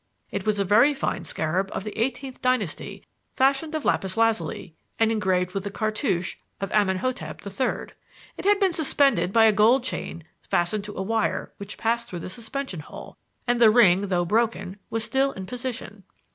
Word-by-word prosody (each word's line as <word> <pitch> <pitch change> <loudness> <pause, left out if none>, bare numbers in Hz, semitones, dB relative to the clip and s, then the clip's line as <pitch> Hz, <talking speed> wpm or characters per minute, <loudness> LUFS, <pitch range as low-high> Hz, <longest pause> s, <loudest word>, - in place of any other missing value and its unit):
It 200 0 -4
was 210 -1 +2
a 200 - +1
very 235 +9 +5
fine 190 -9 -2
scarab 175 +5 -1
of - - -3
the 210 - -6
eighteenth 255 +2 -3
dynasty 255 -9 -1 0.3
fashioned 275 +4 +2
of 310 - -3
lapis 190 +2 0
lazuli 225 -6 0 0.2
and 225 0 +3
engraved 185 -4 0
with 195 -1 -2
the 200 - -3
cartouche 200 -4 -1 0.2
of 195 - -4
Amenhotep 210 +6 -1
III. 200 +6 -2 0.4
It - - -8
had 410 0 +4
been 385 -4 +2
suspended 280 - +2
by 225 +1 +6
a 220 - +7
gold 240 +5 +3
ring 170 - -6 0.2
fastened 200 +4 0
to 210 - -8
a 190 - -1
wire 220 +2 -1
which 200 0 -7
passed 235 +1 0
through 175 -2 -6
the 185 - -6
suspension 235 - -5
hole, 150 - -10 0.3
and 245 -1 +1
the 225 - +9
ring, 200 -4 +5
though 175 -2 +1
broken, 200 -2 0
was 225 -1 -1
still 270 +3 +1
in 190 - -7
position. 235 -3 -6
215 Hz, 180 wpm, -25 LUFS, 190-250 Hz, 0.4 s, the